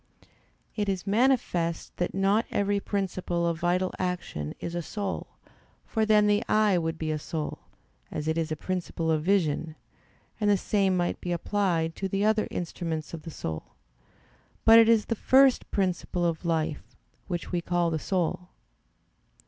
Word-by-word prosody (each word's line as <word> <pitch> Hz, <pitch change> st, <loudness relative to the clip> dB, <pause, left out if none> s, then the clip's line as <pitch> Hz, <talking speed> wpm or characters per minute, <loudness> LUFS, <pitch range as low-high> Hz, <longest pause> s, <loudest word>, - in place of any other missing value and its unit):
It 205 Hz, -2 st, -1 dB
is 190 Hz, -1 st, -2 dB
manifest 200 Hz, -7 st, +1 dB
that 175 Hz, -, -2 dB
not 195 Hz, +3 st, +2 dB
every 200 Hz, 0 st, +1 dB
principle 185 Hz, -4 st, -2 dB
of 170 Hz, -1 st, -1 dB
vital 180 Hz, +2 st, +1 dB
action 175 Hz, -, -3 dB
is 170 Hz, -, -5 dB
a 175 Hz, -, -2 dB
soul, 200 Hz, +3 st, -4 dB, 0.6 s
for 220 Hz, -1 st, 0 dB
then 210 Hz, -1 st, +5 dB
the 205 Hz, 0 st, +3 dB
eye 215 Hz, -2 st, +4 dB
would 165 Hz, 0 st, -2 dB
be 160 Hz, -1 st, -2 dB
a 155 Hz, -, -1 dB
soul, 155 Hz, 0 st, -4 dB, 0.5 s
as 150 Hz, 0 st, -4 dB
it 160 Hz, -, +1 dB
is 165 Hz, -1 st, -1 dB
a -, -, 0 dB
principle 170 Hz, -1 st, -2 dB
of 155 Hz, -1 st, +1 dB
vision; 165 Hz, -4 st, +1 dB, 0.6 s
and 210 Hz, -1 st, +2 dB
the 205 Hz, -, +5 dB
same 195 Hz, -1 st, +1 dB
might 175 Hz, 0 st, -1 dB
be 175 Hz, -, -3 dB
applied 170 Hz, -3 st, 0 dB
to 195 Hz, -, -2 dB
the 195 Hz, +2 st, 0 dB
other 215 Hz, 0 st, +2 dB
instruments 165 Hz, -2 st, -4 dB
of 165 Hz, -, -5 dB
the 165 Hz, -, -8 dB
soul: 80 Hz, -, -6 dB, 0.9 s
but 225 Hz, +1 st, +9 dB
it 225 Hz, 0 st, +6 dB
is 225 Hz, -2 st, +4 dB
the -, -, -1 dB
first 265 Hz, +3 st, +4 dB
principle 180 Hz, -2 st, -1 dB
of 165 Hz, 0 st, -1 dB
life, 160 Hz, -2 st, 0 dB, 0.5 s
which 175 Hz, -3 st, -4 dB
we 175 Hz, -1 st, 0 dB
call 175 Hz, 0 st, 0 dB
the 160 Hz, -, -1 dB
soul. 180 Hz, +1 st, -1 dB
180 Hz, 165 wpm, -27 LUFS, 165-205 Hz, 0.9 s, but